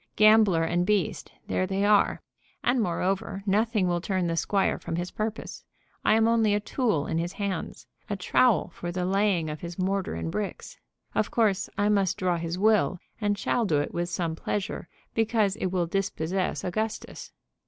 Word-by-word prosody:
Gambler 215 -6 +5
and 175 +2 +1
beast, 200 -4 0
there 185 - 0
they 195 +1 0
are. 205 -1 +3 0.4
And, 245 0 +2
moreover, 195 +1 -1
nothing 210 -1 +2
will 175 -1 0
turn 185 -1 -1
the 165 -1 0
squire 195 +5 +1
from 165 - -4
his 175 +1 -3
purpose. 220 0 -4 0.4
I - - +4
am 225 0 +4
only 225 -3 +3
a - - +2
tool 210 - 0
in 160 - -1
his 175 +2 -3
hands, 200 -4 -4 0.2
a 205 - -1
trowel 215 +5 +2
for 175 - -5
the 180 0 -2
laying 195 -3 +1
of 150 0 -5
his 170 0 -7
mortar 190 - -1
and 80 0 -3
bricks. - - -5 0.3
Of 215 - +1
course 210 -5 +1
I 205 +1 +2
must 195 -3 +2
draw 180 -2 +1
his 170 +1 -3
will, 210 -2 +3 0.2
and 205 -1 +1
shall 235 +3 0
do 165 -9 +2
it 145 - -3
with 175 0 -2
some 170 -3 -2
pleasure, 205 +5 -3 0.2
because 220 -3 +1
it - - -1
will 180 -1 0
dispossess 185 0 -2
Augustus." 215 +4 -4
195 Hz, 180 wpm, -27 LUFS, 175-210 Hz, 0.4 s, Gambler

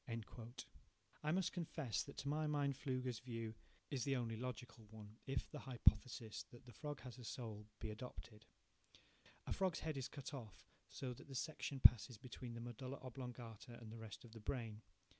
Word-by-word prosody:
I 150 - +3
must 185 +1 +4
confess 160 - 0
that 140 - -6
to 140 - -2
my 155 +2 +3
mind 145 -2 +3
Pflüger's 130 -3 0
view 115 -2 -2 0.4
is 130 -4 +2
the 135 +2 +3
only 115 -3 +1
logical 120 -1 -4
one, 110 0 -9
if 135 -2 +1
the - - -3
hypothesis 120 -2 +4
that 120 0 -12
the 125 - -9
frog 145 +1 -3
has 125 0 -7
a - - -7
soul 110 -3 -4
be 110 - -1
adopted. 110 -1 -7 1.0
A - - +1
frog's 185 -3 +2
head 155 -2 0
is 130 - 0
cut 140 0 -5
off 115 -8 -6 0.2
so 130 -2 -2
that 120 - -11
the 135 - -6
section 145 0 -1
passes 120 0 +10
between 120 0 -6
the 115 - -4
medulla 130 +3 -4
oblongata 120 -3 -5
and 115 -2 -7
the 115 - -6
rest 110 +1 -6
of 115 - -11
the 115 - -8
brain. 110 -1 -1
125 Hz, 180 wpm, -44 LUFS, 115-140 Hz, 1.0 s, passes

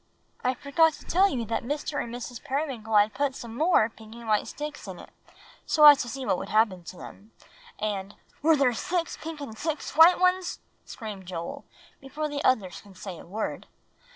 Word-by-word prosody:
I 255 +1 +1
forgot 315 +5 +3
to - - -13
tell 385 +3 +4
you 245 -7 -2
that 225 - -2
Mr. 290 +6 -3
Periwinkle - - -1
and 235 - -7
Mrs. 245 -1 -7
Periwinkle 260 -6 -2
had 210 +1 +5
put 280 -2 -1
some 230 -3 -8
more 310 -5 +4
pink 220 0 -14
and 235 -1 -10
white 215 -1 +2
sticks 295 0 -7
in - - -7
it, - - -13 0.6
so 305 -1 +5
as 290 -2 +10
to 240 - -5
see 265 0 -5
what 180 - +1
would - - -6
happen 210 -5 +2
to 180 - -9
them, 210 +5 -12 0.4
and" 200 -2 -3 0.3
"Were 320 +1 +5
there 270 -4 +3
six 340 +7 -2
pink 320 -1 -7
and 225 -6 -7
six 305 +5 -4
white 325 +3 +8
ones?" 365 0 +1 0.3
screamed 205 -5 -8
Joel, 170 -2 -6 0.3
before 285 +3 -4
the 290 -1 -4
others 200 -8 +1
could 195 -2 -17
say 190 -3 -7
a - - -12
word. 210 +5 -4
250 Hz, 205 wpm, -27 LUFS, 215-300 Hz, 0.6 s, as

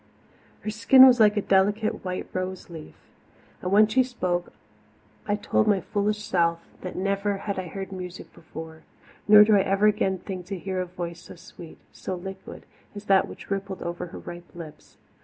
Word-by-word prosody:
Her 215 - -4
skin 230 +5 +7
was 250 -2 +6
like 210 -1 +5
a 205 - +1
delicate 205 +3 +1
white 185 -1 -4
rose 185 -1 -5
leaf, 160 -2 -10 0.7
and 180 - -3
when 210 +2 +6
she 220 +5 +2
spoke 180 -9 -2 0.8
I 205 - +1
told 210 +1 0
my 205 -2 +3
foolish 210 +2 -2
self 170 -4 +1 0.2
that 185 - -6
never 200 +1 -1
had 200 -1 -4
I 185 - -5
heard 195 +3 -7
music 180 -1 -8
before; 160 0 -10 0.5
nor 210 0 +9
do 210 0 +4
I 200 - +5
ever 195 +2 +1
again 210 -3 +2
think 180 -1 -7
to 195 0 -4
hear 185 +1 -3
a 180 - -4
voice 175 -1 -6
so - - -12
sweet, 170 -1 -13 0.2
so 185 - -5
liquid, 190 +1 -9 0.3
as 205 0 -8
that 195 -2 +4
which - - -12
rippled 195 -1 -4
over 175 +1 -5
her - - -10
ripe 175 0 -10
lips. 165 -3 -12
190 Hz, 185 wpm, -25 LUFS, 180-210 Hz, 0.8 s, nor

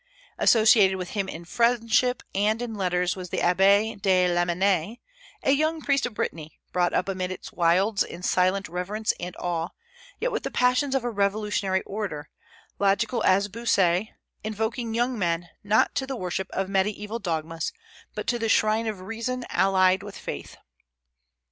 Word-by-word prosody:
Associated 215 -4 +5
with 180 -2 -5
him 200 -2 -2
in 170 +1 -8
friendship 235 +3 +2
and 210 +3 +1
in 240 -2 -4
letters 180 -3 0
was 180 -1 -7
the - - -3
Abbé 200 +4 +3
de 185 -2 +3
Lamennais, 175 +4 +1 0.5
a 270 - +3
young 310 +3 +1
priest 280 -4 +1
of 235 - -11
Brittany, 155 -5 -4
brought 180 -1 +1
up - - 0
amid 185 -1 -2
its 185 - -8
wilds 185 +5 +2
in 175 - -3
silent 185 +2 +1
reverence 195 +6 -2
and 180 0 -6
awe, 170 -1 -2 0.5
yet - - -1
with - - -2
the - - -4
passions 255 +2 +2
of 265 - +1
a 245 - -1
revolutionary 200 -2 0
orator, 190 -8 -5 0.5
logical 220 +4 +1
as 195 +2 +4
Bossuet, 200 -3 +1 0.4
invoking 220 +2 -3
young 240 0 0
men, 170 -2 -1
not 210 +2 +3
to 265 - -2
the 270 - -3
worship 190 -2 -3
of 195 0 -2
mediaeval 210 +3 -1
dogmas, 165 -3 -3 0.4
but - - -4
to 240 - 0
the 225 -1 -1
shrine 220 +1 +2
of 210 -4 -4
reason 230 +5 -4
allied 190 -1 +3
with 205 0 -9
faith. - - -7
200 Hz, 160 wpm, -25 LUFS, 180-225 Hz, 0.5 s, Associated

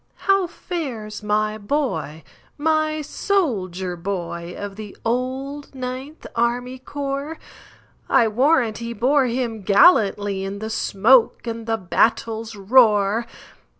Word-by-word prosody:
"How 390 -2 +3
fares 255 - -5
my 215 +1 0
boy,—my 295 - -2
soldier 195 - -1
boy, 175 -1 -5
Of 205 -1 -6
the 210 -1 -9
old 265 +4 -3
Ninth 260 +4 -6
Army 245 +2 -1
Corps?I 280 -3 -3
warrant 245 0 +2
he 235 0 -5
bore 260 +4 +2
him 235 -3 -3
gallantlyIn 200 - +3
the 220 +1 -5
smoke 225 +4 +3
and 230 -1 -5
the 225 0 +1
battle's 225 +3 0
roar!" 210 0 +3
230 Hz, 100 wpm, -22 LUFS, 205-275 Hz, -, How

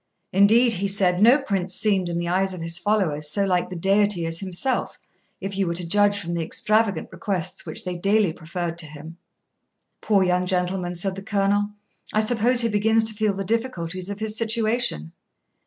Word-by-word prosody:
Indeed, 225 +5 +5
he 200 0 -1
said, 190 -2 +1
no 240 +6 +7
prince 195 -9 -3
seemed, 195 -5 +1
in 170 - -3
the 170 0 -2
eyes 190 +2 0
of 175 - -8
his 165 +1 +2
followers, 175 -8 0
so 200 +6 0
like 180 -2 0
the 185 - -7
Deity 195 0 +2
as 165 0 0
himself, 195 +7 -1 0.4
if 195 0 -5
you 195 -1 0
were 170 - -2
to 175 0 -2
judge 205 +2 +3
from 170 -3 -5
the 170 - -2
extravagant 210 +2 0
requests 185 -1 -4
which - - -6
they 180 -1 -4
daily 200 -1 +2
preferred 170 0 -5
to 160 - -1
him.' 155 +3 -11 0.8
'Poor 200 -3 +2
young 180 0 +1
gentleman,' 180 -1 -1
said 190 +2 -1
the 195 - -7
Colonel, 205 0 0 0.4
'I 215 - +2
suppose 240 +2 +2
he 230 - +2
begins 220 +2 +2
to 220 0 +3
feel 210 -2 0
the 195 - -3
difficulties 185 -5 -3
of 205 0 -6
his 215 -1 -3
situation. 220 - 0
195 Hz, 190 wpm, -23 LUFS, 175-210 Hz, 0.8 s, no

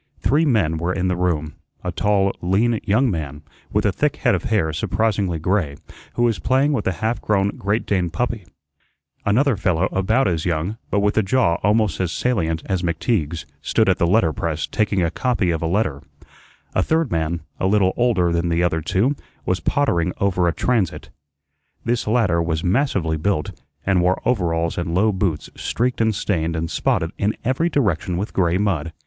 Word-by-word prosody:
Three 150 +4 +2
men 100 - +2
were 85 +3 -1
in 95 0 -1
the 90 - +1
room 85 -4 -1 0.3
a 90 - -2
tall, 100 +1 +1
lean 105 +6 +2
young 115 +4 +2
man, 75 -4 -5 0.3
with - - +1
a - - +3
thick - - 0
head - - +1
of - - -1
hair 95 -8 +1
surprisingly 100 +1 0
gray, 80 -3 0 0.4
who 120 - +1
was 115 -3 +2
playing 135 +3 +2
with 115 -7 -1
a - - +3
half 115 +2 0
grown 100 -2 +1
great 100 +2 -2
Dane 90 -4 0
puppy; 115 0 -3 0.8
another 125 +5 +3
fellow 95 -2 +1
about 110 +6 +2
as 85 -3 0
young, 90 +6 -2
but 100 - +1
with 105 +2 +2
a - - +4
jaw 95 -4 +2
almost 105 -1 +2
as 90 -3 0
salient 80 -11 -1
as 95 -3 -1
McTeague's, 85 - -1 0.2
stood 110 +7 +1
at 95 - +2
the 85 - +3
letter 90 -4 +3
press 80 -2 -2
taking 105 -4 0
a 85 - 0
copy 120 -8 0
of 80 - -2
a 80 - 0
letter; 85 -6 0 0.7
a - - +2
third 160 - +1
man, 85 0 -1 0.2
a 95 - +1
little 95 -2 +3
older 110 -8 +2
than 85 0 0
the 85 +1 +1
other 80 -2 +1
two, 115 - +1 0.3
was 95 0 0
pottering 90 - +1
over 90 -3 +2
a - - +3
transit. 110 -1 -1 0.7
This 120 -1 0
latter 105 -7 +2
was 80 -1 -1
massively 95 - +1
built, 80 -1 -1 0.3
and 95 -2 +3
wore 90 +1 +2
overalls 85 -8 0
and 85 -1 -2
low 105 +4 +3
boots 95 -5 -2
streaked 125 0 -1
and 110 -2 +2
stained 85 -5 -1
and 80 0 -3
spotted 80 +1 0
in 105 +2 0
every 130 +8 +1
direction 95 - 0
with 100 +4 -4
gray 90 -2 +2
mud. 85 -6 -1
95 Hz, 190 wpm, -21 LUFS, 85-110 Hz, 0.8 s, a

